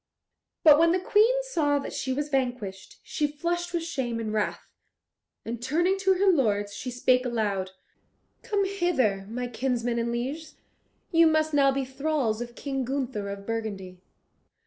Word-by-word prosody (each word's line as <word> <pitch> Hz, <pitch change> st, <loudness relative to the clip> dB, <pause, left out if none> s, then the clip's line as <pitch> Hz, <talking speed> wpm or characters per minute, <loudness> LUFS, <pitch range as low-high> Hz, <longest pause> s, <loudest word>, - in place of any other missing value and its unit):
But 300 Hz, -2 st, +8 dB
when 335 Hz, +1 st, +5 dB
the 370 Hz, -, +2 dB
Queen 450 Hz, +7 st, +3 dB
saw 310 Hz, -13 st, +1 dB
that 280 Hz, -, -5 dB
she 260 Hz, -, -2 dB
was 290 Hz, +3 st, -1 dB
vanquished, 245 Hz, -8 st, -3 dB
she 300 Hz, -, -1 dB
flushed 345 Hz, +4 st, -3 dB
with 340 Hz, -1 st, -1 dB
shame 260 Hz, -8 st, -3 dB
and 215 Hz, -1 st, -3 dB
wrath, 210 Hz, -1 st, -2 dB, 0.7 s
and 235 Hz, +1 st, -5 dB
turning 345 Hz, +9 st, +1 dB
to 385 Hz, 0 st, +3 dB
her 385 Hz, +2 st, +1 dB
lords, 210 Hz, -, +2 dB
she 250 Hz, +5 st, -5 dB
spake 250 Hz, +1 st, +2 dB
aloud, 210 Hz, -6 st, -1 dB, 0.7 s
"Come 415 Hz, -4 st, 0 dB
hither, 280 Hz, -, 0 dB
my 245 Hz, +2 st, -3 dB
kinsmen 240 Hz, -1 st, -1 dB
and 235 Hz, 0 st, -1 dB
lieges. 280 Hz, +7 st, -4 dB, 0.6 s
You 330 Hz, -1 st, +6 dB
must 315 Hz, 0 st, +2 dB
now 275 Hz, -1 st, +5 dB
be 270 Hz, 0 st, -1 dB
thralls 265 Hz, -4 st, -1 dB
of 240 Hz, 0 st, -7 dB
King 270 Hz, -2 st, -3 dB
Gunther 250 Hz, -6 st, -3 dB
of 200 Hz, 0 st, -7 dB
Burgundy." 200 Hz, -5 st, -5 dB
265 Hz, 160 wpm, -27 LUFS, 230-325 Hz, 0.7 s, But